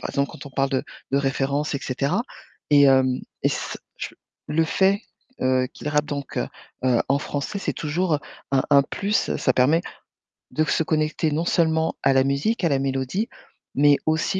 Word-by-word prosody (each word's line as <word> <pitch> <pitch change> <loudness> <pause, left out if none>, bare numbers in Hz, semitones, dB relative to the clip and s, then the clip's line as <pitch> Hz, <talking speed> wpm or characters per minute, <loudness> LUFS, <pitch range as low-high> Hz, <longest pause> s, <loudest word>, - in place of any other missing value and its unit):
par - - -4
exemple, 140 0 0
quand 145 - -10
on - - -9
parle 135 0 0
de 130 -2 0 0.3
de 135 - +2
référence 140 +2 0
et 140 - 0
cetera 140 - 0 0.5
et 145 -1 +7
hem, 130 -2 +4 0.2
et - - +4
c - - -3 0.2
je - - -5 0.4
le 160 +1 +2
fait, 195 +4 +2 0.4
heu, 130 0 +2
qu'il - - -6
rappe 150 0 +1
donc 140 -2 -5
heu - - 0 0.4
heu, 125 -2 +3
en 140 +1 +3
français 145 +6 -3
c'est - - -2
toujours, 165 +3 0
heu, - - +1 0.3
un 135 -1 +4
un 140 -1 +7
plus, 205 +9 -1
ça - - +2
permet 145 +6 +4 0.7
de 155 - +1
se 155 - +1
connecter 155 0 0
non 155 +3 0
seulement 160 -2 +2
à 135 - +5
la 135 0 +4
musique, 140 +12 0
à 170 - +3
la 140 - +2
mélodie, 135 - -1 0.5
mais 145 +1 +5
aussi 160 +4 +1
145 Hz, 190 wpm, -24 LUFS, 135-160 Hz, 0.7 s, et